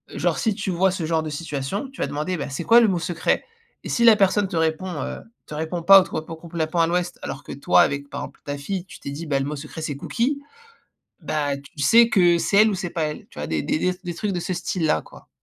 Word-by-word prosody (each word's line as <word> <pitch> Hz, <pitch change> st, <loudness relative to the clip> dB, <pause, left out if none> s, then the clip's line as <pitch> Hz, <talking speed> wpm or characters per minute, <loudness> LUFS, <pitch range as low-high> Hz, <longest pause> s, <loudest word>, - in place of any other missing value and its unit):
genre -, -, 0 dB
si 220 Hz, -, +1 dB
tu 200 Hz, -2 st, -3 dB
vois 185 Hz, +2 st, +2 dB
ce 180 Hz, -3 st, -3 dB
genre 160 Hz, -1 st, +1 dB
de 155 Hz, -, -4 dB
situation, 150 Hz, -, -4 dB
tu 270 Hz, -, -16 dB
vas -, -, +2 dB
demander: 155 Hz, +5 st, -2 dB
«Beh 140 Hz, -, -4 dB
c'est 140 Hz, +5 st, -4 dB
quoi 230 Hz, +1 st, +7 dB
le 225 Hz, -, +5 dB
mot 180 Hz, -3 st, 0 dB
secret?» 165 Hz, 0 st, 0 dB, 0.4 s
et -, -, -7 dB
si 235 Hz, -, +1 dB
la 225 Hz, -, +9 dB
personne 200 Hz, 0 st, +3 dB
te 175 Hz, -, -5 dB
répond 160 Hz, +3 st, 0 dB
heu, -, -, -5 dB, 0.3 s
te 150 Hz, -, -7 dB
répond 160 Hz, +2 st, -3 dB
pas 195 Hz, +1 st, +9 dB
ou -, -, 0 dB
te -, -, -8 dB
répond 160 Hz, +1 st, -4 dB
complètement 165 Hz, 0 st, -2 dB
à 165 Hz, -, +3 dB
l'ouest 175 Hz, +1 st, -1 dB
alors 135 Hz, -, -6 dB
que -, -, -9 dB
toi 140 Hz, -, +4 dB
avec, 140 Hz, 0 st, 0 dB
par -, -, -4 dB
exemple -, -, -9 dB
ta 145 Hz, 0 st, -3 dB
fille, 185 Hz, +5 st, -4 dB
tu -, -, -13 dB
t'es -, -, -7 dB
dit, 155 Hz, +4 st, -6 dB
bah, 140 Hz, -2 st, +1 dB
le 135 Hz, -, -1 dB
mot 150 Hz, +1 st, -3 dB
secret 150 Hz, +2 st, -8 dB
c'est 145 Hz, -3 st, -3 dB
cookie, 240 Hz, -, -1 dB, 0.8 s
bah 145 Hz, -2 st, -1 dB
tu 140 Hz, +1 st, -12 dB
sais 230 Hz, +10 st, +6 dB
que 175 Hz, -3 st, +4 dB
c'est 200 Hz, +4 st, +2 dB
elle 220 Hz, -, +4 dB
ou -, -, -1 dB
c'est 180 Hz, -2 st, -4 dB
pas 165 Hz, -2 st, -1 dB
elle. 150 Hz, 0 st, -5 dB
Tu -, -, -13 dB
vois -, -, -3 dB
des 80 Hz, -2 st, -1 dB
des -, -, 0 dB, 0.2 s
t 180 Hz, -, -21 dB
des 175 Hz, -1 st, -4 dB
trucs 200 Hz, +3 st, -2 dB
de 175 Hz, -, -2 dB
ce 185 Hz, -, -3 dB
style-là 170 Hz, -, 0 dB
quoi. -, -, -16 dB
170 Hz, 275 wpm, -23 LUFS, 150-190 Hz, 0.8 s, la